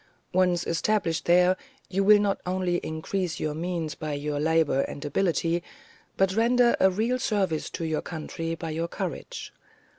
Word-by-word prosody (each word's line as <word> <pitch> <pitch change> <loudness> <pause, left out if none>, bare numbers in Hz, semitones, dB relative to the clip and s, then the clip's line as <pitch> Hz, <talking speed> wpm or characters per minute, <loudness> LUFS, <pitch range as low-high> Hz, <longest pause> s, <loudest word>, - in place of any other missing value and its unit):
Once 180 -1 +2
established 165 -1 0
there, 180 +1 +5 0.3
you 195 +1 0
will 210 +1 +8
not 205 -1 0
only 180 -1 0
increase 165 +2 -3
your 155 -1 -1
means 165 -1 -3
by 155 -1 -5
your 145 0 -2
labour 160 -3 +2
and 140 - -5
ability, 170 +2 +1 0.6
but 190 -1 +3
render 240 +1 +4
a 190 - +6
real 225 +7 0
service 190 -9 0
to 165 - -4
your 160 -1 -1
country 165 0 -4
by 165 -1 -5
your 165 +2 -2
courage. - - -5
175 Hz, 155 wpm, -27 LUFS, 160-195 Hz, 0.6 s, will